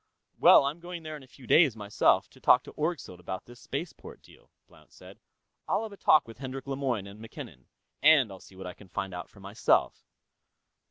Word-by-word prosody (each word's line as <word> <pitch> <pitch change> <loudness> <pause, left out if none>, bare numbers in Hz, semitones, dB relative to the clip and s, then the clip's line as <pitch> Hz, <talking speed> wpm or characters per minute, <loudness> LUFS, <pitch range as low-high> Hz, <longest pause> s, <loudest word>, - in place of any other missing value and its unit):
"Well, - - +7
I'm 145 +4 -3
going 175 -1 -8
there 155 -1 -6
in 150 - -10
a 130 - -16
few 130 0 -16
days, 145 -3 +5
myself, 105 -1 +2
to - - -19
talk - - +5
to - - -11
Orgzild 150 - -4
about 90 +1 -6
this 120 0 -14
spaceport 150 +6 -7
deal," - - -20 0.2
Blount - - -22
said. - - -15 0.5
"I'll - - 0
have 220 - -6
a - - -10
talk 155 -8 +4
with 115 +1 -12
Hendrik 135 0 -6
Lemoyne 135 -7 -2
and 100 +1 -12
MacKinnon. 115 0 -11 0.3
And 140 -9 +5
I'll 95 - -10
see 95 - -17
what 95 0 -9
I 90 - -6
can 95 0 -17
find 95 +2 -4
out 90 0 -7
for 100 - -18
myself." 100 +3 +1
125 Hz, 210 wpm, -28 LUFS, 100-150 Hz, 0.5 s, Well